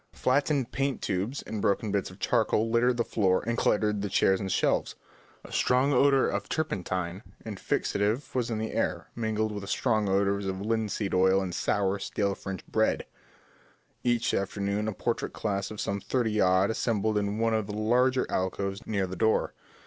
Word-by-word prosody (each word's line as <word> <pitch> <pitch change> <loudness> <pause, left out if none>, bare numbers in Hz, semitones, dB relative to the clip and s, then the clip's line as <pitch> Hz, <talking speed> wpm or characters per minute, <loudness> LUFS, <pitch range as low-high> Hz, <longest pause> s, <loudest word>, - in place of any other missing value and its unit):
Flattened 140 -1 +1
paint 135 -2 -1
tubes 100 +8 -2
and 110 -2 -5
broken 100 +2 +1
bits 100 -2 -1
of 90 - -13
charcoal 110 +2 +1
littered 120 +1 +3
the 120 - +2
floor 95 -6 +1
and 115 +1 0
cluttered 105 -2 +1
the 100 - -2
chairs 95 0 +3
and 95 -1 -3
shelves. - - +1 0.5
A - - -12
strong 130 +3 +2
odour 135 +1 +4
of - - -3
turpentine 95 - -2 0.2
and 105 -4 -6
fixative 110 +7 -1
was 125 -2 0
in 115 - -1
the 110 +1 -3
air, - - -2
mingled 110 -1 -1
with 105 -1 -5
the 100 - -8
stronger 110 -3 +1
odours 100 0 +1
of 95 0 -3
linseed 105 -1 -1
oil 95 +1 +4
and 95 -2 -3
sour, 100 +1 0
stale 100 0 -1
French 95 -2 -7
bread. - - +1 1.0
Every 120 -2 +1
afternoon 100 +2 -2
a 110 - -1
portrait 115 +4 -2
class 100 -2 -2
of 110 - -8
some 100 +1 -1
thirty 110 -3 0
odd 95 +3 +4
assembled 110 -2 0
in 105 0 0
one 115 0 +1
of 110 -2 0
the 105 - -5
larger 125 +4 +2
alcoves 95 +2 -2
near 100 -3 0
the 95 0 -6
door. 110 +5 +1
105 Hz, 180 wpm, -28 LUFS, 100-115 Hz, 1.0 s, odour